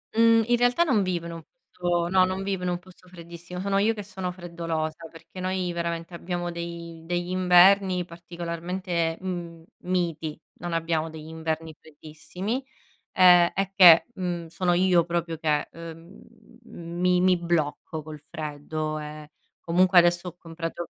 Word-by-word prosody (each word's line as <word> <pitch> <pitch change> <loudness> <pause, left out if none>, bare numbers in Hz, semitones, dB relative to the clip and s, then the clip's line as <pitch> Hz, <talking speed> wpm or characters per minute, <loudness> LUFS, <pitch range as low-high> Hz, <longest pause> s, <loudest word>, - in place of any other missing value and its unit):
mhmm, 230 0 +5
in 240 0 +3
realtà, 245 +7 +3
non 235 - +2
vivo 175 -2 -2
in 170 - -6
un 165 - -8
posto 175 - -3
no, 185 0 +5
non 185 +1 -3
vivo 195 -2 -2
in 180 - 0
un 175 0 -2
posto 185 0 -19
freddissimo. 175 0 -10
Sono 195 +1 0
io 215 +3 +3
che 210 -2 -7
sono 190 -2 -5
freddolosa, 165 -2 -4
perché 170 +3 -13
noi 185 -1 -1
veramente 170 0 -4
abbiamo 175 0 -4
dei 170 -1 -7
degli 175 +1 -2
inverni 185 0 +5
particolarmente, 170 0 -4
mhmm, 170 -3 -6 0.2
miti, 165 -4 -2 0.2
non 175 0 -4
abbiamo 165 -1 -1
degli 155 0 -10
inverni 160 -1 -4
freddissimi. 160 - -6 0.5
Ehm 180 -2 +6
è 195 0 -1
che, 175 -4 +8
mhmm, 175 -3 -3
sono 175 +2 0
io 180 -2 +4
proprio 170 -2 -3
che, 150 -2 0
ehm, 165 +2 -11 0.4
mi 175 0 -1
mi 185 0 +4
blocco 160 -2 -2
col 155 -1 -10
freddo. 155 0 -4
Ehm, 150 0 -8 0.3
comunque 180 +2 +4
adesso 175 +1 +3
ho 175 - -10
comprato 165 0 -6
175 Hz, 155 wpm, -26 LUFS, 165-185 Hz, 0.5 s, che